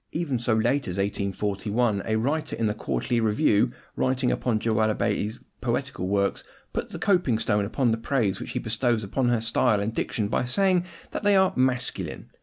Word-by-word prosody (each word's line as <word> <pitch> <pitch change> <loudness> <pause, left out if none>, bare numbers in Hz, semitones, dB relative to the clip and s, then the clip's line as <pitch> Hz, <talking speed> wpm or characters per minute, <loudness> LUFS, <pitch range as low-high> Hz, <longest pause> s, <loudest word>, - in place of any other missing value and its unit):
Even 150 -7 -1
so 120 -1 +1
late 120 +6 +1
as 90 +1 -4
1841, 100 +2 0
a 110 - +1
writer 140 +8 -1
in 115 - -1
the 105 - +1
Quarterly 110 - -1
Review, 110 +1 +3 0.2
writing 130 -1 +1
upon 120 -4 0
Joanna 110 -1 +1
Baillie's 105 -1 -1 0.2
poetical 90 - -2
works, 100 0 0 0.3
puts - - -3
the - - -5
coping 175 - +2
stone 105 -2 +1
upon 120 +3 +1
the 110 - +1
praise 115 -4 0
which - - -6
he - - -2
bestows 120 -4 0
upon 120 +5 0
her 120 -2 +2
style 115 -1 +2
and 105 +2 -2
diction 110 -2 -1
by - - 0
saying 180 +7 +2 0.3
that - - -3
they 205 -1 +4
are 190 -1 +4
"masculine." 130 -1 -1
115 Hz, 185 wpm, -26 LUFS, 105-130 Hz, 0.3 s, they